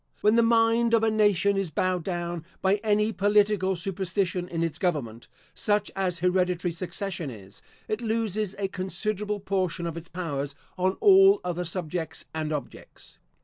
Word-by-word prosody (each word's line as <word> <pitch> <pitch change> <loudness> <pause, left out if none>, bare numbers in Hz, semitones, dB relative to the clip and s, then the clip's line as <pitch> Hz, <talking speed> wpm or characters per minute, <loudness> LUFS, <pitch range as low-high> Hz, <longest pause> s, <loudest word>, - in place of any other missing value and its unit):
When 210 - +4
the 235 - +5
mind 230 0 +4
of 225 - +2
a 220 - +3
nation 200 -2 +3
is 195 -3 -1
bowed 180 +3 0
down 175 -2 -3 0.2
by 195 +2 +2
any 210 +1 +1
political 205 -2 +2
superstition 185 0 -2
in 165 -1 -1
its 165 -2 -3
government, 135 - -2 0.3
such 205 0 0
as 185 -2 -1
hereditary 180 0 +1
succession 180 -1 -4
is, 100 -4 -12 0.3
it 215 +2 -2
loses 215 -3 -1
a 200 -1 -1
considerable 205 +2 -3
portion 185 -3 -1
of 165 -1 -4
its 170 0 -8
powers 145 -5 -4 0.2
on 185 +1 +1
all 390 -1 +7
other 180 0 -2
subjects 165 -2 -4
and 155 -1 -3
objects. 150 -2 -8
185 Hz, 155 wpm, -27 LUFS, 170-210 Hz, 0.3 s, all